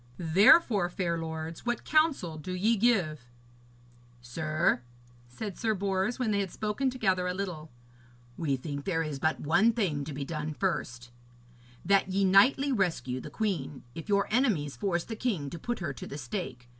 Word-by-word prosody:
Therefore, 195 Hz, -, +5 dB
fair 175 Hz, -1 st, -1 dB
lords, 160 Hz, 0 st, -5 dB
what 240 Hz, 0 st, -2 dB
counsel 290 Hz, -, +2 dB
do 185 Hz, +5 st, -5 dB
ye 215 Hz, +6 st, +2 dB
give?' 185 Hz, -, +1 dB, 0.9 s
'Sir,' 155 Hz, +3 st, 0 dB, 0.5 s
said 195 Hz, -, -6 dB
Sir 220 Hz, -2 st, +1 dB
Bors, 195 Hz, +3 st, -1 dB
when 250 Hz, -4 st, 0 dB
they 200 Hz, -, +1 dB
had 195 Hz, -2 st, -1 dB
spoken 215 Hz, +8 st, -1 dB
together 190 Hz, -8 st, 0 dB
a 180 Hz, -, -2 dB
little, 175 Hz, -5 st, -5 dB, 0.7 s
'we 150 Hz, -5 st, 0 dB
think 140 Hz, +1 st, -6 dB
there 165 Hz, -4 st, 0 dB
is 150 Hz, -3 st, -4 dB
but 155 Hz, +3 st, 0 dB
one 200 Hz, +10 st, +4 dB
thing 175 Hz, -11 st, -1 dB
to 155 Hz, -, -6 dB
be 140 Hz, 0 st, -4 dB
done 150 Hz, 0 st, -4 dB
first: 125 Hz, -10 st, -3 dB, 0.7 s
that 195 Hz, +1 st, +3 dB
ye 195 Hz, +1 st, +1 dB
knightly 255 Hz, +9 st, +5 dB
rescue 165 Hz, -, -1 dB
the -, -, -8 dB
queen, 170 Hz, -11 st, -3 dB
if 165 Hz, -, -8 dB
your 200 Hz, 0 st, +2 dB
enemies 205 Hz, -, +1 dB
force 175 Hz, +4 st, -1 dB
the 225 Hz, -, -6 dB
king 195 Hz, -, -2 dB
to 170 Hz, -, -6 dB
put 240 Hz, +7 st, -3 dB
her 165 Hz, -6 st, -3 dB
to -, -, -8 dB
the 140 Hz, -, -7 dB
stake. 125 Hz, -3 st, -5 dB
180 Hz, 170 wpm, -29 LUFS, 155-210 Hz, 0.9 s, Therefore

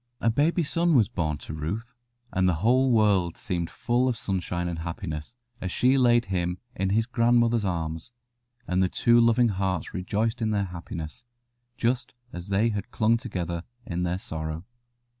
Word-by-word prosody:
A 115 Hz, -, +2 dB
baby 160 Hz, +8 st, +2 dB
son 170 Hz, +2 st, +2 dB
was 110 Hz, -6 st, +4 dB
born 80 Hz, -9 st, -1 dB
to 75 Hz, -, -8 dB
Ruth, 95 Hz, +11 st, -4 dB, 0.4 s
and 95 Hz, 0 st, +3 dB
the 90 Hz, -, +2 dB
whole 130 Hz, +2 st, +4 dB
world 100 Hz, -7 st, +3 dB
seemed 85 Hz, -2 st, -2 dB
full 120 Hz, +2 st, 0 dB
of 120 Hz, -, -1 dB
sunshine 90 Hz, -3 st, -2 dB
and 85 Hz, -2 st, -3 dB
happiness 80 Hz, +3 st, -5 dB, 0.3 s
as 95 Hz, -, -3 dB
she 130 Hz, +7 st, +3 dB
laid 120 Hz, -2 st, +4 dB
him 90 Hz, -2 st, -1 dB, 0.2 s
in 95 Hz, 0 st, 0 dB
his 110 Hz, +3 st, +2 dB
grandmother's 120 Hz, -2 st, +3 dB
arms, 80 Hz, +1 st, -3 dB, 0.6 s
and 90 Hz, +1 st, +1 dB
the 95 Hz, -, +2 dB
two 120 Hz, +4 st, +4 dB
loving 115 Hz, +1 st, +4 dB
hearts 95 Hz, -3 st, -2 dB
rejoiced 110 Hz, +6 st, -1 dB
in 110 Hz, -, +1 dB
their 100 Hz, -2 st, +1 dB
happiness, 85 Hz, -1 st, -7 dB, 0.5 s
just 120 Hz, +1 st, -1 dB, 0.2 s
as 90 Hz, +2 st, -7 dB
they 100 Hz, +4 st, +3 dB
had 105 Hz, -3 st, -4 dB
clung 110 Hz, +1 st, +2 dB
together 90 Hz, -8 st, -3 dB, 0.2 s
in 85 Hz, +1 st, -3 dB
their 90 Hz, 0 st, 0 dB
sorrow. 80 Hz, -1 st, -5 dB
100 Hz, 170 wpm, -26 LUFS, 85-120 Hz, 0.6 s, was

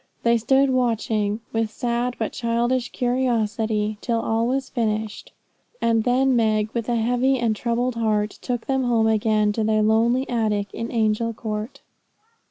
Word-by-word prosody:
They 235 Hz, 0 st, +3 dB
stood 265 Hz, +4 st, +3 dB
watching, 225 Hz, -4 st, 0 dB
with 225 Hz, -1 st, 0 dB
sad 240 Hz, +1 st, -2 dB
but 220 Hz, -, -3 dB
childish 240 Hz, +1 st, 0 dB
curiosity, 225 Hz, -4 st, -1 dB
till 230 Hz, -2 st, 0 dB
all 225 Hz, +1 st, 0 dB
was 265 Hz, +1 st, -1 dB
finished; 220 Hz, -3 st, -3 dB, 0.5 s
and 225 Hz, -1 st, +1 dB
then 255 Hz, +1 st, +3 dB
Meg, 215 Hz, -2 st, +1 dB
with 235 Hz, -1 st, -3 dB
a 240 Hz, -, +1 dB
heavy 245 Hz, +4 st, +2 dB
and 230 Hz, -3 st, 0 dB
troubled 240 Hz, +3 st, -1 dB
heart, 215 Hz, -2 st, 0 dB
took 245 Hz, -2 st, -3 dB
them 265 Hz, -1 st, 0 dB
home 230 Hz, -2 st, +2 dB
again 215 Hz, -1 st, +2 dB
to 220 Hz, -, -1 dB
their 215 Hz, 0 st, +2 dB
lonely 235 Hz, +4 st, +2 dB
attic 210 Hz, -4 st, -1 dB
in 230 Hz, +1 st, -5 dB
Angel 225 Hz, 0 st, 0 dB
Court. 215 Hz, +2 st, -5 dB
230 Hz, 155 wpm, -23 LUFS, 215-245 Hz, 0.5 s, They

